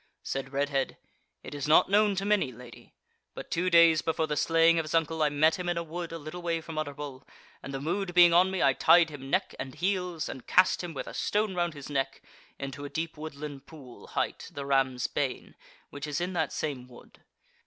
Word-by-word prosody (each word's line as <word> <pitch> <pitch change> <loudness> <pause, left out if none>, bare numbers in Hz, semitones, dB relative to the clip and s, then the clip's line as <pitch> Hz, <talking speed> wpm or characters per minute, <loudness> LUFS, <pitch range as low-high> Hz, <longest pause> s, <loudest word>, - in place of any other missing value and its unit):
Said 135 0 -4
Redhead: 140 -1 -1 0.5
"It - - -8
is 145 0 -4
not 155 - +6
known 205 0 +4
to 195 +1 -2
many, 205 -10 +2
lady; 120 0 -14 0.4
but - - -9
two 180 +2 +1
days 165 -2 +6
before 160 0 0
the 150 -1 -2
slaying 165 +2 +4
of - - 0
his 155 - -4
uncle, 160 0 +1
I 150 - +4
met 155 +4 +2
him 180 -1 -2
in 175 - -1
a 170 - -1
wood 170 +1 -6
a 165 - -5
little 155 +3 -8
way 170 -1 -1
from 160 -1 -6
Utterbol, 145 -2 -6 0.4
and, 140 - -7
the 135 - -4
mood 175 +5 -2
being 175 -1 +7
on 180 +2 +5
me 190 -1 -1
I 135 -1 +5
tied 165 +3 +5
him 135 -2 -9
neck - - 0
and 130 0 -6
heels 180 -3 -1
and 130 - -8
cast 185 0 +4
him, 170 -3 -6
with - - -4
a - - -9
stone 210 -1 0
round 175 -3 -1
his 140 -2 -9
neck, 135 -2 -2 0.3
into 135 +1 -6
a 145 - -5
deep 160 +1 -4
woodland 150 -2 -8
pool 135 -6 -13
hight - - -3
the 140 - -6
Ram's 135 -2 +1
Bane, 135 -3 -3 0.4
which 145 +1 -6
is 150 +1 -2
in 180 +2 -2
that 160 -3 -1
same 135 -5 -4
wood. 125 -1 -17
155 Hz, 220 wpm, -28 LUFS, 140-170 Hz, 0.5 s, being